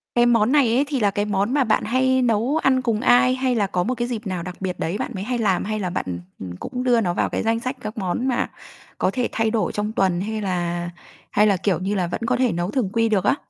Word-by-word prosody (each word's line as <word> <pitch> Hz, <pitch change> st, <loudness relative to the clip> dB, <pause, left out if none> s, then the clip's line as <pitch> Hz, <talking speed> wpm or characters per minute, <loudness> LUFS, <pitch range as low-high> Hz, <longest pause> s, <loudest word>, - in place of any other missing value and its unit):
Cái 240 Hz, -, +5 dB
món 235 Hz, 0 st, +3 dB
này 265 Hz, -6 st, +4 dB
ấy 275 Hz, +3 st, +3 dB
thì 280 Hz, -3 st, -1 dB
là 205 Hz, -3 st, +2 dB
cái 205 Hz, +1 st, -1 dB
món 205 Hz, +4 st, 0 dB
mà 285 Hz, -, +3 dB
bạn 220 Hz, -3 st, +1 dB
hay 260 Hz, +3 st, +2 dB
nấu 240 Hz, +5 st, +1 dB
ăn 260 Hz, -4 st, +2 dB
cùng 230 Hz, -4 st, 0 dB
ai? 255 Hz, +1 st, +4 dB
Hay 260 Hz, -1 st, 0 dB
là 205 Hz, -4 st, +1 dB
có 180 Hz, -2 st, -1 dB
một 250 Hz, +7 st, -1 dB
cái 240 Hz, 0 st, -2 dB
dịp 225 Hz, -3 st, -4 dB
nào 180 Hz, -3 st, -3 dB
đặc 180 Hz, -1 st, -7 dB
biệt 185 Hz, -2 st, -3 dB
đấy 170 Hz, +5 st, -2 dB
bạn -, -, -4 dB
mới 190 Hz, -, -4 dB
hay 245 Hz, +2 st, -2 dB
làm? 200 Hz, -5 st, +1 dB
Hay 215 Hz, 0 st, -2 dB
là 185 Hz, -3 st, -2 dB
bạn, 175 Hz, -, -3 dB
ừm, 90 Hz, -1 st, -5 dB, 0.3 s
ừm, 90 Hz, -, -8 dB
cũng 250 Hz, -, -5 dB
đưa 245 Hz, -2 st, +3 dB
nó 175 Hz, -3 st, 0 dB
vào -, -, 0 dB
cái -, -, -2 dB
danh 225 Hz, +1 st, +1 dB
sách 255 Hz, +3 st, -3 dB
các 215 Hz, +1 st, -6 dB
món 195 Hz, +5 st, -1 dB
mà 250 Hz, -2 st, 0 dB, 0.5 s
có -, -, +1 dB
thể 250 Hz, -2 st, -1 dB
thay 225 Hz, -1 st, 0 dB
đổi 225 Hz, -2 st, 0 dB
trong 210 Hz, +1 st, -2 dB
tuần 185 Hz, -4 st, +1 dB
hay 220 Hz, +1 st, -3 dB
là 175 Hz, -2 st, -2 dB, 0.4 s
hay 210 Hz, +1 st, +4 dB
là, 200 Hz, -3 st, +3 dB
kiểu 185 Hz, -2 st, 0 dB
như 195 Hz, +3 st, -2 dB
là, 180 Hz, -2 st, 0 dB
vẫn 175 Hz, -, -4 dB
có -, -, +1 dB
thể 250 Hz, -2 st, +2 dB
nấu 175 Hz, +3 st, -2 dB
thường 235 Hz, -7 st, 0 dB
quy 225 Hz, -1 st, +2 dB
được 200 Hz, -4 st, +1 dB
á? -, -, +3 dB
215 Hz, 290 wpm, -22 LUFS, 190-245 Hz, 0.5 s, Cái